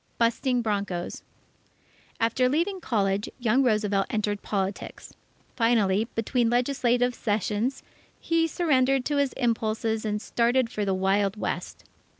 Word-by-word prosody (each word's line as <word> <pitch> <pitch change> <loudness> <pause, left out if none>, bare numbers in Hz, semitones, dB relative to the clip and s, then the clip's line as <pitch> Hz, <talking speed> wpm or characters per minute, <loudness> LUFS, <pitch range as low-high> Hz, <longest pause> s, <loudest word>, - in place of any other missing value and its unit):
Busting 240 +1 +1
Broncos 200 -5 -3 1.0
After 250 +3 +2
leaving 355 +7 0
college, 200 -5 0
young 245 +1 +2
Roosevelt 210 -5 +1
entered 210 -1 -1
politics. 195 -1 -4 0.4
Finally, 220 -3 +2
between 230 +1 +1
legislative 245 0 +1
sessions, 215 +3 -1 0.4
he 330 0 +1
surrendered 270 -6 +2
to 290 - 0
his 280 -2 +1
impulses 225 -2 -1
and 210 -1 -1
started 235 +2 +1
for 210 -3 -2
the 195 -1 +1
Wild 195 +2 +1
West. - - -4
230 Hz, 120 wpm, -26 LUFS, 205-255 Hz, 1.0 s, After